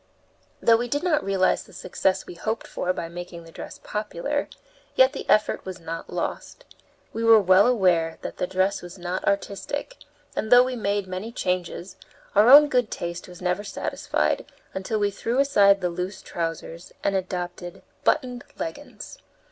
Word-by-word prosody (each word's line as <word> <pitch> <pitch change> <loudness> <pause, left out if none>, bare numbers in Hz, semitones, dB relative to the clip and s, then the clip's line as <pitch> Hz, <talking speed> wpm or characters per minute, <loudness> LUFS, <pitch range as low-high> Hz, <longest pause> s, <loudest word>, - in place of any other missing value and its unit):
Though 230 -1 +6
we 240 +1 -2
did 290 +6 -1
not 315 -5 +2
realize 195 -1 +2
the 195 - -16
success 190 +1 -1
we - - -9
hoped 220 +6 -3
for 180 - -2
by 170 -2 -4
making 175 0 -8
the 165 - -14
dress - - -9
popular, 215 +7 -3 0.5
yet 260 +1 +5
the - - -7
effort 215 - +3
was 185 -1 -7
not 165 0 -7
lost. - - -4 0.5
We 225 - -3
were 225 -1 +8
well 190 +2 +5
aware 180 -9 +2
that - - -6
the 180 - -1
dress 190 +2 0
was 175 +1 -10
not 180 +1 -4
artistic, 200 - -2 0.4
and 220 - -3
though 245 0 +9
we 255 0 -3
made 205 -3 -1
many 185 +5 -5
changes, 180 -3 -3 0.4
our 210 +4 +6
own 295 +3 +10
good 250 -6 +1
taste 170 0 -5
was 180 0 -12
never 180 +3 0
satisfied 205 - -1 0.3
until 190 +3 -2
we 205 -1 +1
threw 230 +5 -2
aside 200 -8 +5
the 180 - 0
loose 180 +3 -5
trousers 165 0 -5
and 200 - +1
adopted 180 -1 -4 0.2
buttoned 250 -5 +1
leggins. 225 - -7
195 Hz, 170 wpm, -25 LUFS, 180-230 Hz, 0.5 s, own